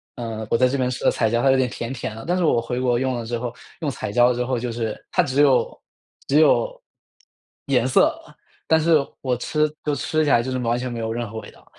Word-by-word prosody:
嗯， 115 -2 -5
我 - - +2
在 130 +2 +4
这 140 - -1
边 125 -1 0
吃 125 - -5
的 - - +4
彩 110 - +1
椒 120 +1 +1
它 135 - +5
有 135 - +3
点 130 -1 +1
甜 115 +2 -5
甜 115 -4 -5
的。 115 - -8
但 180 +1 +1
是 180 - 0
我 120 -6 +3
回 125 +1 -3
国 125 -2 +1
用 130 0 0
了 120 -1 -4
之 120 +1 -3
后， 120 0 -5 0.3
用 150 -3 -1
彩 100 - -5
椒 120 +1 +4
之 125 +1 -2
后， 130 0 -1
就 120 0 -3
是 115 -2 -4
它 180 - +3
只 140 -1 +1
有 135 -3 +3 0.5
只 145 +2 +4
有 - - +3 0.9
颜 - - +2
色， - - +3 0.5
但 160 - +4
是 160 0 +4 0.2
我 130 -2 0
吃 150 +4 0
就 150 -1 0
吃 155 +2 0
起 145 - +1
来 120 - +5
就 130 - -4
是 130 - -1
完 120 0 0
全 125 0 -4
没 115 - -5
有 110 0 -3
任 120 -1 -4
何 110 +1 -6
味 - - -11
道。 - - -21
125 Hz, 285 characters per minute, -22 LUFS, 115-140 Hz, 0.9 s, 它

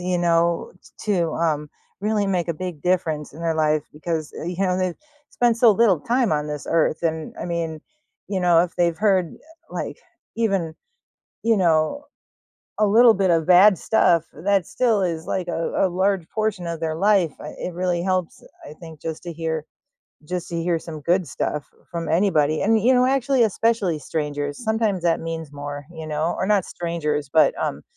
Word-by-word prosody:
you 180 0 -1
know, 170 0 +1 0.3
t 210 - -1
to, 170 -4 +1
um, 150 -3 -1 0.3
really 210 0 0
make 180 -3 -1
a 170 - 0
big 180 -3 -6
difference 165 -5 0
in 160 - -10
their 165 -1 0
life 155 -1 +2
because, 155 0 -4
uh, - - -5
you 175 0 -4
know, 185 -2 +1
they've 185 -2 -1 0.4
spent 240 -2 +2
so 235 -2 +7
little 195 -6 +3
time 240 - +1
on 150 0 0
this 150 -1 -5
earth, 165 -1 +1
and, 160 -1 -2
I - - -4
mean, 165 -3 -3 0.5
you 195 -2 -1
know, 175 -2 +5
if 180 - -9
they've 170 -2 +2
heard, 190 -5 +1
uh, - - -17 0.4
like, - - -4 0.4
even, 195 -8 0 0.7
you 230 -1 +4
know, 170 - +1 0.7
a 215 - +4
little 225 +3 +6
bit 190 -2 +1
of 165 -2 +2
bad 185 +1 +7
stuff 170 -7 +3 0.2
that 195 -3 +2
still 225 -6 +1
is 165 -3 -2
like 185 -2 -2
a 165 -1 -2 0.2
a - - 0
large 190 -1 0
portion 215 -5 -2
of 165 -1 -4
their 160 -1 -2
life. 195 -3 +3
I 150 - -7
it 180 - -5
really 175 -1 -1
helps, 185 -2 -2 0.3
I - - -9
think 160 -3 -11
just 160 -1 -5
to 175 - -5
hear 160 -1 -3 0.6
just 180 -1 -3
to 170 - -4
hear 170 0 0
some 155 -2 -8
good 175 +1 +1
stuff 145 +2 -3 0.2
from 170 -1 -4
anybody 160 -4 +2
and, 220 +1 +3
you 245 +5 +4
know, 250 0 +4
actually, 270 -1 +2
especially 215 -6 +1
strangers, 145 +3 -3
sometimes 220 -5 0
that 165 -1 +2
means 160 -2 -5
more, 145 0 -7
you 160 -2 -8
know, 155 +2 -1
or - - 0
not 200 -3 +2
strangers, 150 -4 -3
but, 160 - +5
um, 70 - -3
170 Hz, 190 wpm, -22 LUFS, 160-195 Hz, 0.7 s, so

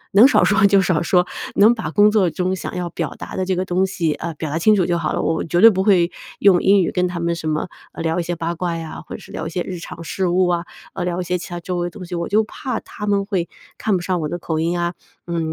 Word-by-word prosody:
能 210 +6 +8
少 - - +4
说 200 -1 +4
就 195 -1 +5
少 175 -4 +1
说， 180 +1 +3 0.3
能 220 +4 +6
把 225 - -4
工 210 0 +5
作 195 -5 +3
中 185 +2 -1
想 - - -6
要 180 -1 -2
表 165 -2 -4
达 - - -8
的 185 - 0
这 185 0 0
个 185 - 0
东 185 +1 +1
西， 165 -5 -1
呃， 170 -1 -5
表 155 0 -5
达 160 - -1
清 215 +5 +4
楚 185 -3 +2
就 170 -1 0
好 155 -2 -1
了， - - -1
我 160 - 0
绝 175 +2 0
对 225 - +10
不 190 -1 0
会 180 -4 +4 0.3
用 190 -3 +5
英 195 0 +5
语 - - 0
跟 180 -1 +1
他 175 -1 -5
们 170 0 0
什 160 -1 -5
么， 155 +3 -1 0.2
呃， - - -6
聊 165 +1 0
一 - - 0
些 175 +1 -3
八 170 +1 -2
卦 170 0 -2
呀， 165 -1 -7
或 - - -8
者 - - -16
是 - - -14
聊 160 - -4
一 - - -4
些 175 +1 -2
日 180 -2 -6
常 165 - -9
事 185 +4 -1
务 180 +1 +3
啊， 175 -1 0 0.3
呃， 180 - -3
聊 180 0 -2
一 - - -3
些 180 +1 -1
其 175 - -8
他 175 0 -5
周 180 +1 -4
围 175 - -1
的 - - -10
东 185 -3 -9
西， 180 - -6
我 170 -1 -2
就 215 +2 +3
怕 255 +3 -4
他 210 - -8
们 200 -1 +1
会 185 -5 -1 0.3
看 215 -3 0
不 175 - -3
上 180 -1 -1
我 150 - -2
的 175 - -4
口 160 -2 -3
音 170 +2 0
啊， 175 0 -1 0.3
嗯， 165 -2 -2
175 Hz, 330 characters per minute, -20 LUFS, 170-190 Hz, 0.3 s, 对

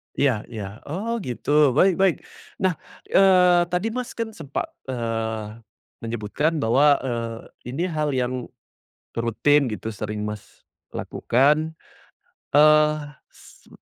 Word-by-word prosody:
Iya 125 -7 +1
iya, 105 -2 -4 0.2
oh 200 +10 -3
gitu, 125 +2 -6 0.3
baik 185 +2 +5
baik. 190 -2 +4 0.5
Nah, 185 -2 +3 0.4
eee, 180 -2 +6
tadi 180 +5 0
Mas 250 0 -5
kan 230 -1 -3
sempat, 160 -9 -5 0.2
eee, 115 -3 -3 0.4
menyebutkan 115 +8 -1
bahwa, 130 +6 +4 0.2
eee, 115 -3 -3 0.4
ini 165 +6 -1
hal 155 -2 -1
yang 125 0 0 0.9
rutin 130 +4 +2
gitu 110 +1 -5
sering 105 0 -4
Mas 105 -1 -8 0.3
lakukan, 150 +6 +1 0.8
eee, 155 0 +6 0.3
s - - -19
140 Hz, 115 wpm, -23 LUFS, 115-165 Hz, 0.9 s, eee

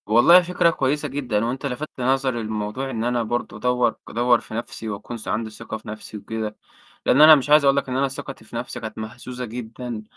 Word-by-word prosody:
والله 120 +12 +7
فكرة 175 -1 +2
كويسة 145 -2 0
جدًا، 120 -6 -1
هو 120 - 0
أنت 135 +3 -5
لفت 140 +3 -3
نظري 130 -2 +1
لموضوع 110 +5 -3
إن 115 -3 -3
أنا 120 0 0
برضو 120 -1 -3
أدوّر 125 0 +1
أدوّر 120 0 +3
في - - -12
نَفْسي 115 -1 -5
وأكون 105 +3 -6
عندي 110 +1 -1
ثقة 110 0 -7
في 110 - -17
نَفْسي 110 0 -7
وكده، 110 +1 -5 0.5
لإن 135 - +5
أنا 155 0 +11
مش 140 0 -2
عايز 150 0 +7
أقول 140 0 +4
لك 140 - -1
إن 130 - -1
أنا 140 +1 +2
ثقتي 135 -3 -8
في 115 - -12
نَفْسي 120 +1 -4
كانت 110 -1 -7
مهزوزة 120 +3 -6
جدًا، 120 0 -6
120 Hz, 215 wpm, -23 LUFS, 110-135 Hz, 0.5 s, أنا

